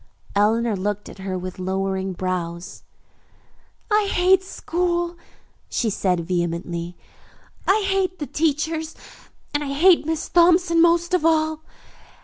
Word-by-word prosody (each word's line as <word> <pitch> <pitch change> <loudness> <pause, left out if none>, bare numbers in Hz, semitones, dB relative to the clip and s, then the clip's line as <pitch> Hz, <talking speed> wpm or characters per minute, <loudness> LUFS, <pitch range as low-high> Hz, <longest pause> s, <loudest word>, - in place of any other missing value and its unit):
Eleanor 220 +2 +2
looked 205 +2 -3
at - - -13
her 190 -1 -3
with 185 0 -7
lowering 190 +1 -2
brows. 175 -1 -4 1.1
"I 420 -1 +3
hate 370 +1 +4
school," 345 -1 -2 0.5
she 225 -3 0
said 180 -3 0
vehemently. 170 0 -3 0.7
"I 410 +2 +3
hate 380 -1 0
the 295 - -4
teachers, 315 +1 -1 0.6
and 290 0 0
I 275 - -4
hate 330 +2 +4
Miss 320 -1 -2
Thompson 345 -1 +4
most 340 +1 +3
of 365 - +2
all. 315 -1 +2
295 Hz, 125 wpm, -22 LUFS, -, 1.1 s, hate